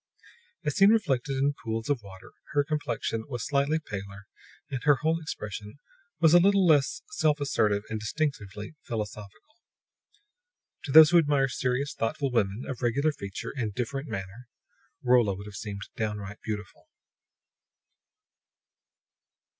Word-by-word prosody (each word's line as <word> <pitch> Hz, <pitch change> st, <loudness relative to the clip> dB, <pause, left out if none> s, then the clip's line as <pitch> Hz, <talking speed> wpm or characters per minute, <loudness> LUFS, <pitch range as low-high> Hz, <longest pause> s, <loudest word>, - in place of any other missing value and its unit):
As 150 Hz, -, 0 dB
seen 195 Hz, +1 st, +7 dB
reflected 140 Hz, -, +1 dB
in 140 Hz, +2 st, +2 dB
pools 115 Hz, -1 st, -3 dB
of 140 Hz, -5 st, 0 dB
water, 95 Hz, -2 st, -13 dB, 0.2 s
her 145 Hz, -, +3 dB
complexion 120 Hz, -6 st, -2 dB
was 120 Hz, -4 st, -4 dB
slightly 140 Hz, +2 st, +1 dB
paler 100 Hz, -8 st, -7 dB, 0.5 s
and 130 Hz, -2 st, -3 dB
her 145 Hz, -, +6 dB
whole 160 Hz, +1 st, +2 dB
expression 105 Hz, -6 st, -6 dB, 0.4 s
a -, -, +2 dB
little 195 Hz, +1 st, +4 dB
less 155 Hz, 0 st, +3 dB
self 155 Hz, -, +1 dB
assertive 105 Hz, -7 st, +1 dB
and 110 Hz, -, -4 dB
distinctively 105 Hz, -4 st, -3 dB
philosophical. 105 Hz, -, -7 dB, 1.3 s
To 140 Hz, -, -4 dB
those 155 Hz, +2 st, +9 dB
who 175 Hz, -, +7 dB
admire 145 Hz, -3 st, +2 dB
serious, 130 Hz, +3 st, -1 dB
thoughtful 130 Hz, +4 st, -2 dB
women 105 Hz, 0 st, 0 dB
of 130 Hz, -3 st, -5 dB
regular 140 Hz, +6 st, +2 dB
feature 100 Hz, -8 st, -6 dB
and 110 Hz, -7 st, -3 dB
different 135 Hz, +4 st, -3 dB
manner, 100 Hz, +5 st, -7 dB, 0.6 s
Rolla 120 Hz, -6 st, +4 dB
would 100 Hz, +2 st, -9 dB
have 105 Hz, -, -10 dB
seemed 100 Hz, 0 st, -6 dB
downright 105 Hz, -2 st, -4 dB
beautiful. 105 Hz, -2 st, -6 dB
125 Hz, 130 wpm, -28 LUFS, 105-145 Hz, 1.3 s, those